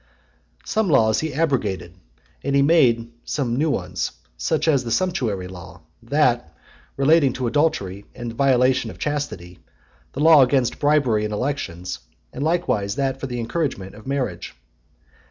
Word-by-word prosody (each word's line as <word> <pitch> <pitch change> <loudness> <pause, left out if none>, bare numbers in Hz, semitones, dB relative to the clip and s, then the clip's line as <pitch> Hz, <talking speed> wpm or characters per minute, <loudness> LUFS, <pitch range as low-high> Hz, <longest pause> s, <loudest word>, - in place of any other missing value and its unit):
XXXIV. - - -21
Some 220 -3 +1
laws 110 -7 +4
he 160 0 -2
abrogated, 110 - -1 0.5
and 140 0 0
he 140 - +5
made 120 -7 +3
some 125 -5 -2
new 155 +5 +1
ones; - - -2 0.2
such - - -1
as 140 -5 +3
the 120 - -5
sumptuary 115 - -1
law, 90 -2 -11 0.2
that 120 - +1 0.4
relating 140 -1 +4
to 130 - -3
adultery 105 - 0
and 120 -1 -5
the - - -11
violation 130 0 +3
of - - -10
chastity, 145 -13 -4 0.5
the - - -6
law 155 -1 +7
against 130 -2 +2
bribery 140 -8 +2
in 105 - -2
elections, 100 -8 -3 0.3
and 140 - -4
likewise 145 - 0
that 135 -1 -1
for 135 - -4
the 125 -1 -4
encouragement 115 - -3
of 105 +3 -13
marriage. 125 - -3
130 Hz, 155 wpm, -22 LUFS, 105-145 Hz, 0.5 s, law